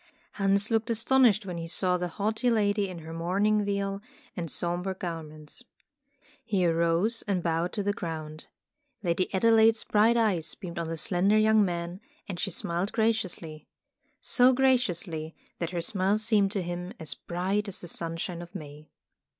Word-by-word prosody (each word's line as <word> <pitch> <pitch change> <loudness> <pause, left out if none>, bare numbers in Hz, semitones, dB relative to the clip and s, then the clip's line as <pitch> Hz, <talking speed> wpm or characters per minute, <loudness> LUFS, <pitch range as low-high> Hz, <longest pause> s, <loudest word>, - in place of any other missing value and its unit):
Hans 200 +2 +2
looked 225 0 +1
astonished 230 -2 +3
when 180 -3 -5
he 165 - -5
saw 180 +2 +3
the 180 0 -1
haughty 215 +7 -1
lady 205 -3 +1
in 180 - -7
her 160 - -7
mourning 200 +6 +1
veil 200 0 -2 0.3
and 170 -2 -4
somber 175 +4 -2
garments. 160 +1 -7 0.8
He 195 -5 +1
arose 170 +7 +2
and 185 -4 0
bowed 165 +1 0
to 205 - -2
the 205 +1 0
ground. 155 -3 -6 0.6
Lady 175 +1 0
Adelaide's 225 +2 +4
bright 220 +3 +3
eyes 180 -9 +1
beamed 175 -3 -7
on 165 - -3
the 165 - -3
slender 190 +6 +2
young 215 0 +5
man, 175 -1 -3 0.3
and 180 -3 -5
she 195 - 0
smiled 175 +2 -2
graciously. 190 -9 -1 0.5
So 250 +1 +5
graciously, 180 -11 +1 0.2
that 170 - -2
her 175 -1 -3
smile 195 +3 +1
seemed 215 -3 +2
to 195 -4 -1
him 175 +2 -5
as 160 -2 -1
bright 190 +4 -2
as 195 - -4
the 175 - -8
sunshine 170 +1 -3
of 175 +3 -12
May. 150 -3 -9
185 Hz, 160 wpm, -28 LUFS, 170-210 Hz, 0.8 s, young